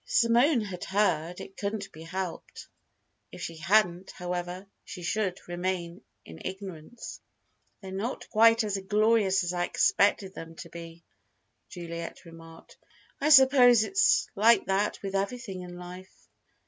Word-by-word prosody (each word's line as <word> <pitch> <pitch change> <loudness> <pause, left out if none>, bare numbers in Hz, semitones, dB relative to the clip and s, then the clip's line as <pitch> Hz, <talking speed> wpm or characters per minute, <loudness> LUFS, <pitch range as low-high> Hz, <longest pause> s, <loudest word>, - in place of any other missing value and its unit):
If - - -24
Simone 240 +3 +4
had 190 -4 -6
heard, 180 -4 0
it 195 - -11
couldn't 200 0 -4
be 155 - -13
helped. 180 +2 -6 0.6
If - - -9
she 165 - -6
hadn't, 180 +1 +2
however, 180 +1 -5 0.2
she 180 - -9
should 185 0 -1
remain 175 0 -3 0.2
in 80 -1 -11
ignorance. 190 +2 -8 0.6
"They're 190 -1 -8
not 205 +7 -4
quite 230 +1 +5
as 200 -2 -2
glorious 205 -1 +2
as 175 0 -2
I 175 0 0
expected 195 +1 +2
them 165 -2 -9
to 170 - -10
be," 170 0 -10 0.7
Juliet 170 -1 -7
remarked. 165 0 -14 0.4
"I 295 - +1
suppose 260 -5 +7
it's 385 - +3
like 225 +3 +4
that 195 +2 0
with 195 -1 -4
everything 195 -1 -3
in 175 0 -9
life." 180 +1 -12
190 Hz, 140 wpm, -28 LUFS, 175-215 Hz, 0.7 s, suppose